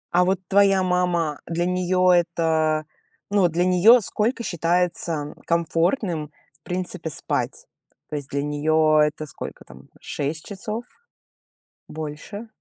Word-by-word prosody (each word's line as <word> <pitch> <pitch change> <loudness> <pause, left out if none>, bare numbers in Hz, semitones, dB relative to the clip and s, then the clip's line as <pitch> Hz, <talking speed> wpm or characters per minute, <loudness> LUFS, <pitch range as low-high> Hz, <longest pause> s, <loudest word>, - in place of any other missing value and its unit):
А, 180 +1 +4
вот, 190 0 +1
твоя 195 -1 +4
мама, 180 -4 0
для 170 +1 -1
неё 180 0 +2
это, 160 -3 +2
э, 155 - -44 0.4
ну, 200 -3 +4
для 170 +1 0
неё 185 +7 +6
сколько 225 +4 -1
считается, 175 -1 0
м, 150 -1 -4
комфортным 170 - 0 0.3
в - - -59
принципе 180 -2 -3
спать? 150 - -3 0.4
То 150 - -3
есть 140 -2 -6
для 140 0 -2
неё 155 +1 +2
это 150 0 +1
сколько, 150 - -8
там, 65 +2 -15
6 150 +2 -4
часов? 215 +3 -5 1.1
Больше? 155 +8 -7
170 Hz, 135 wpm, -23 LUFS, 155-185 Hz, 1.1 s, неё